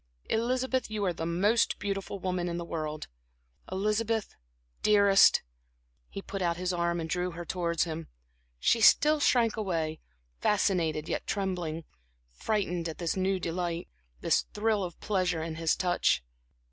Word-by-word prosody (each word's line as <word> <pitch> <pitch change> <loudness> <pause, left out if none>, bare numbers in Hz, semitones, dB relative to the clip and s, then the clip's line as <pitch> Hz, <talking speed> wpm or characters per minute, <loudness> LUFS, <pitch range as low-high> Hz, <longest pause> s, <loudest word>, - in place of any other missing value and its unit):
Elizabeth, 255 +3 0
you 210 -2 -2
are 180 - +1
the 165 0 -4
most 200 +7 +2
beautiful 195 0 -3
woman 180 -2 -2
in 170 - -3
the 170 - -4
world. 155 -2 -4 0.6
Elizabeth, 215 +3 -1 0.5
dearest"... 200 -2 +5 0.7
He 195 - -7
put 195 - -5
out 170 -1 0
his 180 0 -1
arm 170 0 0
and 160 - -3
drew 180 +2 -1
her 175 +1 -7
towards 170 -2 0
him. 165 -1 -5 0.5
She 230 - +3
still 300 +6 +6
shrank 235 -6 +3
away, 165 -7 -2 0.4
fascinated 170 -7 +1
yet - - -3
trembling, 180 -5 -2 0.5
frightened 180 - -1
at 160 - -7
this 170 -2 -1
new 190 0 0
delight, 170 -1 -3 0.3
this - - +2
thrill 210 -1 +1
of 175 -2 -6
pleasure 180 -5 0
in 160 -1 -5
his 165 -1 +2
touch. 175 - +1
180 Hz, 145 wpm, -29 LUFS, 170-205 Hz, 0.7 s, still